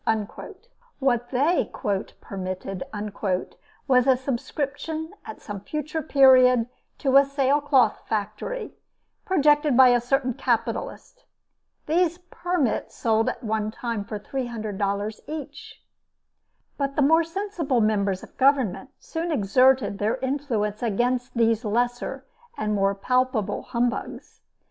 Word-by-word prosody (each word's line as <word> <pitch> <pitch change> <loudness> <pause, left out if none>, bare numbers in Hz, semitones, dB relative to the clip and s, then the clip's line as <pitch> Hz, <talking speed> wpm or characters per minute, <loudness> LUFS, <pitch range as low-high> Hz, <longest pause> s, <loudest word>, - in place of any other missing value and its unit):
What 245 -3 0
they 285 +7 +1 0.5
"permitted" 185 0 -5 1.0
was 250 -1 +4
a 260 -1 +5
subscription 285 +5 -4 0.2
at 220 - -9
some 205 -1 -6
future 305 +6 -4
period 255 -5 +5 0.3
to 270 -2 +3
a 275 - +8
sailcloth 275 -3 +2
factory, 220 - -3 0.5
projected 295 -6 +3
by 260 -1 +8
a 245 -1 +3
certain 255 +1 0
capitalist. 245 - -3 0.6
These 340 +2 +1
"permits" 350 -8 -1
sold 225 -1 +1
at - - -6
one 215 -1 -1
time 230 -1 -4
for 210 +1 -6
$300 210 -3 -3
each. 305 -2 -8 1.0
But 275 0 -1
the 290 - +3
more 320 +4 +5
sensible 330 -6 -2
members 205 -3 +1
of - - -14
Government 260 -4 +2
soon 330 +1 -4
exerted 255 -2 +3
their 220 +4 0
influence 255 -6 -2
against 245 +3 -1
these 230 0 +2
lesser 245 +4 -1 0.3
and 210 0 -1
more 195 -1 +1
palpable 250 0 0
humbugs. 240 +1 -3
250 Hz, 110 wpm, -25 LUFS, 220-285 Hz, 1.0 s, a